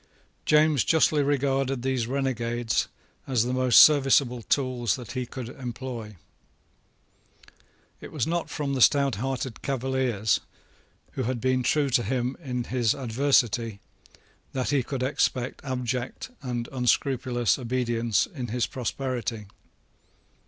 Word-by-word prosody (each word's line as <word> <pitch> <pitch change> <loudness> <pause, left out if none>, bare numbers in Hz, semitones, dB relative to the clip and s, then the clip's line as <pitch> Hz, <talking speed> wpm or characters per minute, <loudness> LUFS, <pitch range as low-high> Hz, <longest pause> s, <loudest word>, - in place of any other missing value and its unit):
James 150 -3 +4
justly 155 -2 +3
regarded 135 -2 0
these 130 -3 0
renegades 120 -3 -1 0.4
as 125 -4 +2
the 125 +1 -2
most 130 -2 +3
serviceable 135 -4 +6
tools 125 -2 0
that 125 -4 -9
he 125 -2 -3
could 125 -2 -7
employ. 120 -4 -7 1.8
It - - -10
was - - -1
not 170 +1 -2
from 145 -2 -3
the 130 - -1
stouthearted 135 -2 +2
Cavaliers, 130 -5 0 0.7
who - - -4
had 125 0 -2
been 130 +1 +1
true 140 +2 +1
to 125 0 +3
him 125 +3 -1
in 125 -3 -3
his 120 -3 0
adversity, 120 -4 +1 0.7
that 130 +1 -1
he 140 -2 +3
could 130 +1 -4
expect 130 -2 -1
abject 125 - -3
and 120 -3 -3
unscrupulous 125 -1 +1
obedience 120 -2 0
in 130 -9 -6
his 120 +1 0
prosperity. 125 -4 -3
130 Hz, 120 wpm, -26 LUFS, 120-135 Hz, 1.8 s, serviceable